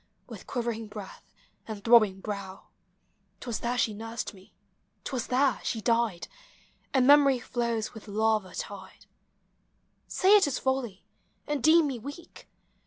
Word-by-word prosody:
With - - -11
quivering 235 -3 -3
breath 205 -2 -11 0.4
and 215 -3 -7
throbbing 215 -5 +5
brow: 200 -2 -7 0.7
'T - - -10
was 235 -3 -3
there 245 +1 -2
she 220 -3 +1
nursed 225 +1 -6
me, 190 -1 -18 0.5
't - - -6
was 245 -3 -2
there 265 +1 +2
she 225 - -2
died, 230 -5 0 0.6
And 260 -2 +3
memory 280 -1 +6
flows 235 -2 -2
with 220 -1 -12
lava 215 -2 0
tide. 190 -2 -8 1.0
Say 390 +3 +4
it 400 -7 +5
is 270 - -1
folly, 260 -7 -2 0.4
and 295 -2 -2
deem 315 +3 +5
mo 265 -3 -3
weak. 285 +8 -11
230 Hz, 145 wpm, -28 LUFS, 210-265 Hz, 1.0 s, memory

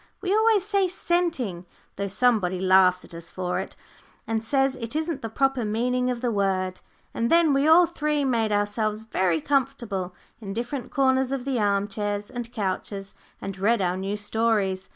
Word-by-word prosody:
we 385 0 -1
always 435 -3 +3
say 400 -2 +2
"scenting," 335 - -1 0.3
though 200 0 -3
somebody 200 -4 +1
laughs 185 -1 +4
at - - -13
us 165 0 -7
for 180 -1 -2
it, - - -6 0.5
and 225 0 -2
says 270 +2 +1
it 230 +3 -5
isn't 315 -2 -2
the 225 - -4
proper 270 +1 +1
meaning 250 +4 0
of 245 -2 -3
the 245 -2 0
word 190 -3 0 0.3
and 230 0 -1
then 335 -3 +4
we 275 +2 +2
all 335 +3 +7
three 300 -4 -1
made 230 -4 +1
ourselves 210 +1 -1
very 185 -6 0
comfortable 235 - -1 0.2
in 200 -3 -6
different 240 +3 -4
corners 265 -1 +2
of 270 -2 -3
the 265 -3 0
arm 200 -1 +1
chairs 205 0 -3
and 240 -1 -5
couches, 195 -2 -4 0.3
and 195 -1 -6
read 225 +4 +2
our 180 -2 0
new 195 +2 -3
stories. 205 -3 0
225 Hz, 175 wpm, -25 LUFS, 195-270 Hz, 0.5 s, all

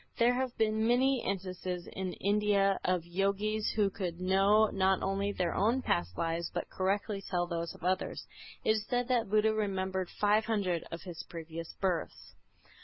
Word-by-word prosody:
There 240 +1 +4
have 255 0 -2
been 220 0 +2
many 255 +1 +3
instances 185 -2 -3
in 190 -1 -4
India 200 -1 +2
of 180 -2 0
Yogis 200 +4 0
who 205 -2 +2
could 180 -4 -4
know 195 +4 +4
not 190 0 +2
only 195 +1 0
their 180 -4 -1
own 235 +6 +2
past 85 +1 0
lives 165 0 -1
but - - -4
correctly 195 +1 -1
tell 175 -3 -1
those 170 -1 -4
of - - -16
others. 185 +1 -1 0.4
It - - +3
is 215 - -5
said 245 -1 0
that 240 -5 +1
Buddha 215 +1 +3
remembered 190 -3 -1
five 210 +1 +2
hundred 195 -6 0
of 165 - -6
his 175 -3 -7
previous 165 0 -7
births. 185 -4 -2
195 Hz, 170 wpm, -32 LUFS, 180-215 Hz, 0.4 s, There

